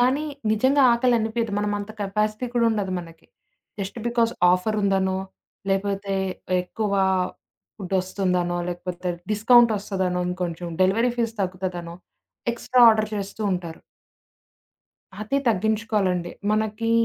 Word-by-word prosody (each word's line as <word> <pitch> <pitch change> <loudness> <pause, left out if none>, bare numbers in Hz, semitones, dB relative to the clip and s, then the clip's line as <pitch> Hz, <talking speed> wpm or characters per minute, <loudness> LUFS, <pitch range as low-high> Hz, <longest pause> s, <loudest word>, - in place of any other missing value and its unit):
కానీ, 265 +5 +2 0.3
నిజంగా 260 +6 +3
ఆకలనిపియదు 235 -2 +1
మనం 205 0 -1
అంత 205 +1 -6
కెపాసిటీ 215 +4 -1
కూడా 235 -1 +3
ఉండదు 200 -4 -1
మనకి. 165 -2 -11 0.5
జస్ట్ 200 +4 -5
బికాజ్ 235 -1 +1 0.2
ఆఫర్ 200 +4 0
ఉందనో, 190 -1 +1 0.5
లేపోతే 195 0 -1 0.5
ఎక్కువ 205 +3 -3 0.8
ఫుడ్ 195 -2 -5
వస్తుందనో, 180 -2 -1
లేకపోతే 180 0 -4 0.2
discount 235 +2 +6
వస్తదనో 190 -3 -2
ఇంకొంచం 175 -1 -4
delivery 225 +6 +3
fees 230 -2 0
తగ్గుతదనో, 180 -2 -3 0.6
extra 250 +1 +1
order 215 -1 +3
చేస్తుంటారు. 195 -4 -3 1.4
అది 215 +6 0
తగ్గించుకోవాలండి. 210 -4 0 0.2
మనకి 220 +1 0
205 Hz, 105 wpm, -24 LUFS, 185-225 Hz, 1.4 s, discount